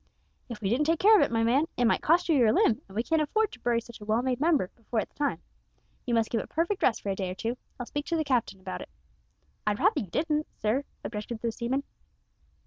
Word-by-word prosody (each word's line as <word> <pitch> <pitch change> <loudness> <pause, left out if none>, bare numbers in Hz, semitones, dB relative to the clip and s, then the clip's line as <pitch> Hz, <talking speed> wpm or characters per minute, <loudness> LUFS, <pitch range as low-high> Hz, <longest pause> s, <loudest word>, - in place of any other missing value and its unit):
"If 230 -3 -7
we 195 - 0
didn't 285 +6 +2
take 330 +1 +3
care 435 +2 +7
of - - +6
it, - - +3
my 225 -1 +2
man, 265 +7 +3
it 245 - +3
might 230 - +3
cost 335 +3 +3
you 325 - +3
your 235 -5 +5
limb, 225 +2 +3
and 195 - -13
we 225 - +1
can't 320 +3 +1
afford 430 +8 +1
to 245 - -12
bury 240 -1 +1
such 235 -1 -12
a - - -8
well 220 +3 +1
made 255 -2 0
member 300 - +2
before 230 0 -3
its - - -4
time! 290 -1 -2 0.6
You 240 - +2
must 225 -1 +1
give 225 - +1
it - - -10
perfect 340 +5 -1
rest 230 - +2
for 200 - -3
a 195 - 0
day 190 -2 -3
or 180 - -5
two. 230 +5 -2 0.2
I'll 245 - -3
speak 290 +4 -4
to 340 - 0
the 315 - +1
captain 245 -8 0
about 185 0 -6
it." - - -9 0.8
"I'd 205 -1 +2
rather - - +3
you 205 - -4
didn't, 300 - 0
sir," 235 +7 0 0.2
objected 220 +1 -5
the 230 - 0
seaman. 245 +5 -2
240 Hz, 260 wpm, -28 LUFS, 220-300 Hz, 0.8 s, care